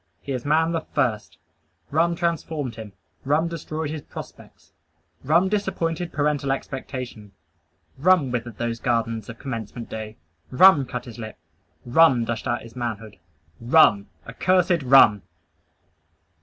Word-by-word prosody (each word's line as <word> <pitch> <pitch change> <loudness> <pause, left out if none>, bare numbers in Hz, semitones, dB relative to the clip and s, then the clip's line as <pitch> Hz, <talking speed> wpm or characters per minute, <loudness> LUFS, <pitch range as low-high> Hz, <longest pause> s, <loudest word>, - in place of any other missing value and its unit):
He 140 - -7
is 125 -1 -4
man 160 +3 +2
the 165 -1 -1
first! 115 - -2 0.5
Rum 170 +3 +2
transformed 160 -6 -2
him. 110 -3 -10 0.3
Rum 150 +4 +1
destroyed 160 -2 -5
his 155 -1 -5
prospects. - - -12 0.5
Rum 170 +7 +3
disappointed 175 -4 -2
parental 145 -2 0
expectation. 130 -6 -6 0.7
Rum 165 -4 +3
withered 120 -3 -4
those 120 -1 -3
garlands 115 -3 -1
of 115 - -8
commencement 115 -3 -6
day. 110 0 -7 0.3
Rum 145 -1 +6
cut 125 -2 -5
his 120 -1 -11
lip. 110 -1 -8 0.5
Rum 125 -2 +4
dashed 115 +2 -4
out 120 -1 -1
his 115 0 -13
manhood. 110 -4 -5 0.4
RUM, 115 -6 +4 0.2
accursed 180 +6 +1
RUM! 125 -6 +6
130 Hz, 130 wpm, -23 LUFS, 115-160 Hz, 0.7 s, Rum